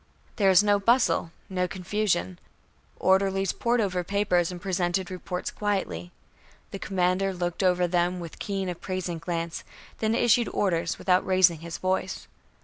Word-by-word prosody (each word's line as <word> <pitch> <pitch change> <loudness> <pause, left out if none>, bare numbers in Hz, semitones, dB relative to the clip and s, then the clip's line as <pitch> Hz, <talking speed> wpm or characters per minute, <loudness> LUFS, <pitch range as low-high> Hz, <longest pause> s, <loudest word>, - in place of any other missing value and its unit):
There 200 -4 +4
was 190 +1 +6
no 205 -1 +3
bustle, 230 -6 +2 0.2
no 180 -1 -1
confusion. 180 - -1 0.6
Orderlies 195 0 +2
pored 240 +1 0
over 185 -4 0
papers 180 -2 +1
and 180 - -7
presented 180 0 -1
reports 180 0 -4
quietly. 190 - -2 0.6
The 195 - -6
commander 190 0 0
looked 175 -1 -3
them 185 - +4
over 175 0 +2
with 170 -2 -9
keen 195 -2 -3
appraising 180 -1 -4
glance, 165 0 -4 0.4
then 220 0 +1
issued 240 0 +3
orders 170 -4 0
without 180 -1 +2
raising 185 -4 +4
his 165 0 -6
voice. 185 0 -2
185 Hz, 140 wpm, -26 LUFS, 175-195 Hz, 0.6 s, was